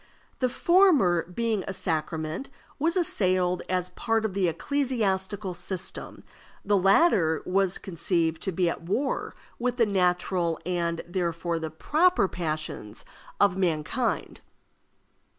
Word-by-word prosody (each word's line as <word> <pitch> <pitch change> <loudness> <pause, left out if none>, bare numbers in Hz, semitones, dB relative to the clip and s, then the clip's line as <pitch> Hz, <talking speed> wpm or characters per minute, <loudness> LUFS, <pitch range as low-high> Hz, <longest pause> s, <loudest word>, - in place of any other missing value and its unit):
The 255 -2 +2
former, 270 - +4
being 220 +1 -1
a 195 - -4
sacrament, 160 - -3 0.3
was 330 +5 +1
assailed 185 - +1
as 180 -1 0
part 225 +1 -1
of 210 - -2
the 190 -2 +1
ecclesiastical 205 - -1
system; 180 +1 -6 0.4
the 205 +1 +3
latter 195 - +4
was 190 0 +1
conceived 170 -2 -1
to 190 - -1
be 180 0 +1
at 170 - -2
war 205 +12 -2 0.2
with 245 +1 -1
the 235 - +4
natural, 180 -3 +1
and, 170 -2 -1
therefore, 170 -2 -2
the 160 -1 -4
proper 310 - +2
passions 155 - -4 0.3
of 200 -3 +4
mankind. 180 +7 -1
185 Hz, 120 wpm, -27 LUFS, 170-225 Hz, 0.4 s, former